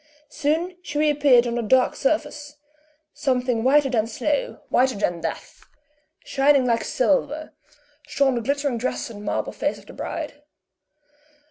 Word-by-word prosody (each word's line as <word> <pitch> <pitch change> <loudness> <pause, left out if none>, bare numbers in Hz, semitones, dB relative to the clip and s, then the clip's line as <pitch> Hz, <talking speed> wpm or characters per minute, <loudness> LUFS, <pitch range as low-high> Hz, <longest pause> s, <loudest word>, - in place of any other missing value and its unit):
Soon 320 +5 -1
she 295 -4 -6
reappeared 290 -5 +4
on 235 - -2
the 240 - -1
dark 255 +3 +3
surface 295 0 -2 0.6
something 250 -3 0
whiter 280 +2 +4
than 225 -4 0
snow, - - -2
whiter 260 +1 +2
than 175 -4 -1
death; - - -6 0.6
shining 275 -1 +3
like 230 -2 +1
silver, 295 +3 0 0.5
shone 275 -2 +2
the 240 - -1
glittering 280 0 -1
dress 250 0 -3
and 205 -2 -10
marble - - -2
face - - -2
of - - -16
the - - -12
bride. 295 -2 -6
270 Hz, 140 wpm, -23 LUFS, 240-295 Hz, 0.6 s, reappeared